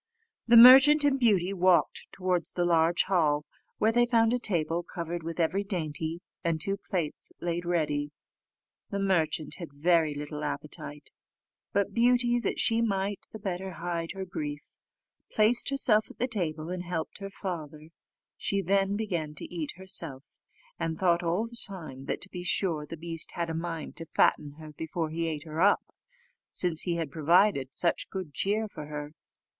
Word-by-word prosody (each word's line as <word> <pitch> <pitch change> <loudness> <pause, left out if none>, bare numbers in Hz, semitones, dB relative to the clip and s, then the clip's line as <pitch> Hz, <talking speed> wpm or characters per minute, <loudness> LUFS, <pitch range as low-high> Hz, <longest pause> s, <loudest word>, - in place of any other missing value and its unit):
The 235 0 +7
merchant 270 +5 +9
and 280 -2 +2
Beauty 200 -6 +3
walked 180 -3 +2
towards 180 -3 -1
the 175 - 0
large 170 0 +3
hall, 150 -6 +1 0.3
where 220 - +3
they 240 +1 +3
found 230 -1 +3
a 250 - +1
table 170 -6 0
covered 170 0 -5
with 165 +1 -6
every 175 +4 +1
dainty, 165 -3 -3 0.2
and 165 -2 0
two 195 +5 -1
plates 175 -6 -4
laid 175 0 -2
ready. 150 -4 0 0.8
The 200 - -3
merchant 165 -6 0
had 170 -4 -7
very 155 +1 +2
little 150 +1 -5
appetite; 145 0 -5 0.6
but 200 -1 0
Beauty, 240 0 +3
that 225 - -2
she 230 0 +2
might 200 -2 -1
the - - -7
better 190 -2 -4
hide 170 -1 -4
her 190 0 -5
grief, 150 -5 -6 0.6
placed 225 +4 +3
herself 235 -6 +3
at - - -14
the 250 - 0
table, 165 -8 -3
and 180 -1 -3
helped 175 -1 -4
her 195 0 -6
father; 160 -6 -6 0.5
she 200 - -1
then 195 +2 +1
began 175 -8 -3
to 150 - -6
eat 160 -4 -4
herself, 165 -7 -4 0.4
and 160 -1 -2
thought 175 -1 +2
all 175 +6 0
the 235 0 -3
time 155 -9 -9
that, - - -3
to 190 - -3
be 180 - -6
sure, 165 -3 0
the 165 - -7
beast 165 0 -4
had 170 -1 -2
a - - -3
mind 165 -1 -5
to 165 0 -5
fatten 145 -1 +2
her 155 0 -11
before 160 +1 -4
he 165 +1 -2
ate 155 -2 -4
her 160 0 -4
up, 205 +2 +3 0.6
since 170 -3 0
he 175 -2 -1
had 165 -4 -3
provided 155 -3 +3
such 170 - 0
good 185 -6 -6
cheer 215 +6 0
for 150 -7 -9
her. 150 0 -6
175 Hz, 170 wpm, -28 LUFS, 155-200 Hz, 0.8 s, merchant